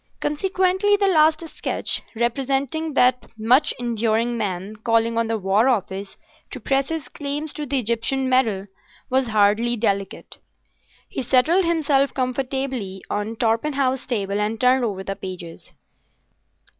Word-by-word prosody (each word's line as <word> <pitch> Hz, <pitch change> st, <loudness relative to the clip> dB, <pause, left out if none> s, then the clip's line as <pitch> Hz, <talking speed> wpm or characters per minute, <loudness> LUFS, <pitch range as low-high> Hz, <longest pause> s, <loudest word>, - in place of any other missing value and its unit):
Consequently 380 Hz, +5 st, +1 dB
the 400 Hz, -, +1 dB
last 320 Hz, -2 st, +3 dB
sketch, -, -, -3 dB
representing 270 Hz, +6 st, -1 dB
that 250 Hz, -3 st, +2 dB
much 250 Hz, +7 st, +4 dB
enduring 230 Hz, 0 st, 0 dB
man 200 Hz, -2 st, -3 dB
calling 230 Hz, +1 st, +1 dB
on 230 Hz, 0 st, +1 dB
the 225 Hz, 0 st, 0 dB
War 205 Hz, +5 st, +2 dB
Office 195 Hz, -4 st, -2 dB, 0.3 s
to -, -, -7 dB
press 270 Hz, 0 st, 0 dB
his 325 Hz, -2 st, -4 dB
claims 290 Hz, +1 st, -5 dB
to 300 Hz, -1 st, -5 dB
the 275 Hz, +1 st, 0 dB
Egyptian 245 Hz, +3 st, 0 dB
medal, 230 Hz, -7 st, +2 dB, 0.5 s
was 260 Hz, -1 st, +2 dB
hardly 215 Hz, +2 st, +2 dB
delicate. 200 Hz, -3 st, -2 dB, 0.7 s
He -, -, -4 dB
settled 300 Hz, +9 st, +3 dB
himself 290 Hz, -5 st, +1 dB
comfortably 255 Hz, -6 st, -3 dB
on 210 Hz, +2 st, -2 dB
Torpenhow's 255 Hz, +4 st, 0 dB
table 205 Hz, -5 st, -1 dB
and 215 Hz, +2 st, -2 dB
turned 255 Hz, 0 st, +4 dB
over 200 Hz, -4 st, -2 dB
the 195 Hz, 0 st, -4 dB
pages. 180 Hz, -4 st, -9 dB
245 Hz, 130 wpm, -22 LUFS, 215-280 Hz, 0.7 s, much